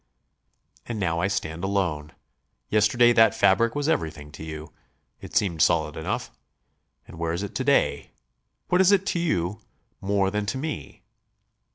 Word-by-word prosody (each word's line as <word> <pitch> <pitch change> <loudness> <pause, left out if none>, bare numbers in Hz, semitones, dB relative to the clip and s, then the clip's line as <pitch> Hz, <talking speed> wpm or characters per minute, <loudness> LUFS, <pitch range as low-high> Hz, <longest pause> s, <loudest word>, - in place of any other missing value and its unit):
"And 115 -3 -4
now 85 -4 0
I 95 - +1
stand 85 -4 -3
alone. 90 -7 -1 0.6
Yesterday 115 +3 +4
that 115 -1 +5
fabric 110 +4 +3
was 145 0 -1
everything 80 - -2
to 80 - -10
you; 80 -1 -8 0.5
it - - -11
seemed 85 -6 +1
solid - - +2
enough. - - -3 0.8
And - - -12
where 85 -1 -1
is 85 +4 -3
it 100 - -6
to - - -2
day? - - +1 0.6
What 180 +1 +4
is 190 +1 +5
it 195 -1 +3
to 175 - -1
you 105 - -1 0.4
more 100 0 +1
than 105 0 -2
to 115 - -2
me? 150 +3 -6
100 Hz, 160 wpm, -25 LUFS, 85-115 Hz, 0.8 s, that